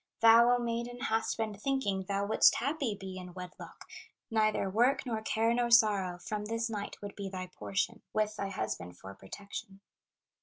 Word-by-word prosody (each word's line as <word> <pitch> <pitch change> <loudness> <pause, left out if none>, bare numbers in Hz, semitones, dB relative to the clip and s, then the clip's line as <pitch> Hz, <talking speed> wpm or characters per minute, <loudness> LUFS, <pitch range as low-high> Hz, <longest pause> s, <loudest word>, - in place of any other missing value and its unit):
"Thou, 230 +1 +8
O - - +1
maiden, 235 0 -3
hast 225 -2 0
been 220 -2 -2
thinking 205 -5 -1
Thou 200 +1 -1
wouldst 215 - +5
happy 275 -4 -1
be 190 -1 -8
in 180 -1 -10
wedlock; 180 -1 -9 0.5
Neither 215 -2 +2
work, 240 +9 +2
nor 225 -3 -2
care, 225 +1 +1
nor 240 0 +1
sorrow, 205 -6 +4
From 210 +3 -4
this 230 +1 -2
night 205 -2 -5
would 205 - -6
be 200 -1 -5
thy 185 -1 -5
portion, 200 +4 -3
With 215 0 0
thy 200 -2 -3
husband 90 - -4
for 95 +2 -10
protection. 195 - -9
215 Hz, 175 wpm, -31 LUFS, 195-230 Hz, 0.5 s, Thou